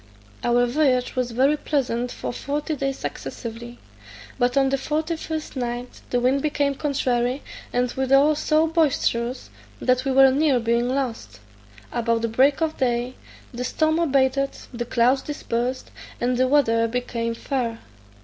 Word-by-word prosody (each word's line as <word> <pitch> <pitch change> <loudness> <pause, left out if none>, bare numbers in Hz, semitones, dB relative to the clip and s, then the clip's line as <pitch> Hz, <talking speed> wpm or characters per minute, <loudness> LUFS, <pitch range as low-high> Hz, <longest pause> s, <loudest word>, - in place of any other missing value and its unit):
Our 240 0 +3
voyage 255 -1 +1
was 250 -1 0
very 265 +5 +3
pleasant 250 -5 -1
for - - -5
forty 295 +4 -3
days 275 -1 -2
successively, 235 +1 -6 0.6
but 245 +1 +2
on 270 -1 +4
the 275 - +1
forty 310 +4 -1
first 315 -1 -5
night 245 -1 -4
the 245 - +1
wind 260 +3 +2
became 285 -1 0
contrary, 260 -3 -1 0.3
and 245 0 0
withal 275 +3 +4
so 310 +1 +2
boisterous 280 -6 0 0.3
that 255 0 +2
we 270 - 0
were 270 0 +7
near 280 -1 +3
being 235 +1 +1
lost: 230 - -3 0.5
about 230 -1 0
break 275 +6 +3
of 315 -1 -2
day 245 -1 0 0.4
the 245 +1 -4
storm 315 +4 +1
abated, 275 -3 +2 0.2
the 240 0 -3
clouds 245 +3 +2
dispersed, 255 -3 -3 0.3
and 250 +1 +1
the 255 +1 +2
weather 230 -5 +3
became 230 -1 -2
fair. 235 -2 -2
255 Hz, 145 wpm, -23 LUFS, 240-280 Hz, 0.6 s, were